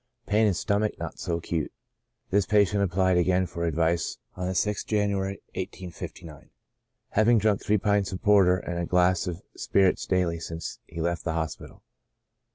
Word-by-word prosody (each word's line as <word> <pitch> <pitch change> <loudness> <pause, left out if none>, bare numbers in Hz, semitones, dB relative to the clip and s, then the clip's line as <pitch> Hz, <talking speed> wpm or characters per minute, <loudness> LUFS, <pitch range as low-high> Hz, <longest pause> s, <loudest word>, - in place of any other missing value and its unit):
Pain 105 +1 +3
in 100 - +1
stomach 105 +3 0
not - - -6
so 85 - -1
acute." 85 -2 -3 0.6
This 100 0 +2
patient 105 -1 +3
applied 95 -1 +2
again 90 +1 +2
for 85 -1 -4
advice 85 +1 0 0.2
on 90 - -3
the 95 - -1
6th 105 +2 -1
January, 100 -2 -1
1859, 90 -4 -8 0.6
having 115 +3 +4
drunk 105 -1 +2
three 105 - +2
pints 100 -1 +1
of 95 - -4
porter 100 -4 +5
and 85 -1 -4
a 85 - -1
glass 90 0 +2
of 90 0 -5
spirits 95 -2 +2
daily 90 -3 +1
since 80 0 -6
he 85 - -8
left 85 0 -1
the 80 - -1
hospital. 80 -1 -5
95 Hz, 165 wpm, -27 LUFS, 85-100 Hz, 0.6 s, porter